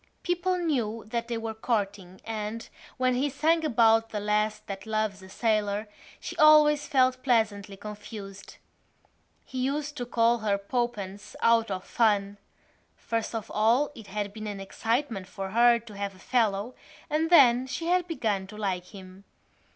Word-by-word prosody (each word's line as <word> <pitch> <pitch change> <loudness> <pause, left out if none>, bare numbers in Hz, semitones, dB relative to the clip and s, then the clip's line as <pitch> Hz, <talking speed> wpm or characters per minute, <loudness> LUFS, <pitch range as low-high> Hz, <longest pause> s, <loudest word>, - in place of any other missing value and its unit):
People 360 +1 0
knew 240 -10 -1
that 235 0 -2
they 235 -1 -2
were 225 0 -4
courting 200 -5 -3
and, 220 0 -4 0.3
when 255 -1 +2
he 265 +4 +1
sang 320 +4 +1
about 225 -5 +4
the 210 - -3
lass 210 +1 0
that 195 -1 -8
loves 215 -3 -1
a 190 - -13
sailor, 210 -1 0 0.3
she - - -7
always 300 -1 +6
felt 255 -3 +2
pleasantly 215 -6 0
confused. 205 -1 -9 0.9
He 260 - -6
used 285 +3 -2
to 245 -2 -4
call 235 0 +2
her 210 -2 +1
Poppens 205 -2 -4
out 230 -1 +3
of 190 -1 -3
fun. 205 -3 +1 0.6
First 230 0 -3
of 225 -1 -5
all 235 +8 +3
it 225 -7 -12
had 205 0 -4
been 215 0 -6
an 205 -1 -5
excitement 225 +1 -2
for 195 0 -6
her 235 +2 +5
to 230 -2 -12
have 200 -1 -4
a - - -17
fellow 220 +1 0 0.3
and 315 +1 0
then 260 -6 +6
she 330 +5 -4
had 355 +1 +2
begun 210 - -1
to 210 +2 -11
like 190 -4 -2
him. 190 0 -13
225 Hz, 160 wpm, -27 LUFS, 205-255 Hz, 0.9 s, always